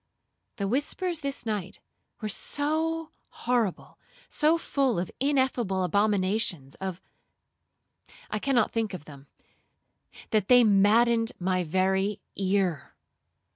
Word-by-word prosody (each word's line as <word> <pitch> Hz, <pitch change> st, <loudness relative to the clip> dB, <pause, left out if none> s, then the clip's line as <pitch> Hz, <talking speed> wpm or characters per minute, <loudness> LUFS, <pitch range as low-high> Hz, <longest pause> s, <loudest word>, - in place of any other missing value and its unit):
The 200 Hz, -, -2 dB
whispers 305 Hz, -, -1 dB
this 280 Hz, -4 st, -4 dB
night 205 Hz, -3 st, -3 dB, 0.4 s
were 215 Hz, -, -2 dB
so 315 Hz, +8 st, -1 dB, 0.3 s
horrible, 235 Hz, -6 st, -1 dB, 0.3 s
so 315 Hz, +2 st, +3 dB
full 275 Hz, -, 0 dB
of 175 Hz, +1 st, -2 dB
ineffable 260 Hz, -8 st, +1 dB
abominations, 190 Hz, -7 st, 0 dB, 1.6 s
of—I 215 Hz, -, 0 dB
cannot 250 Hz, -2 st, +2 dB
think 225 Hz, -4 st, -2 dB
of 155 Hz, -, -10 dB
them,—that 150 Hz, +7 st, -8 dB
they 245 Hz, -1 st, +7 dB
maddened 225 Hz, +3 st, +4 dB
my 185 Hz, 0 st, 0 dB
very 190 Hz, +4 st, 0 dB, 0.2 s
ear. 190 Hz, -6 st, -1 dB
215 Hz, 95 wpm, -27 LUFS, 190-260 Hz, 1.6 s, they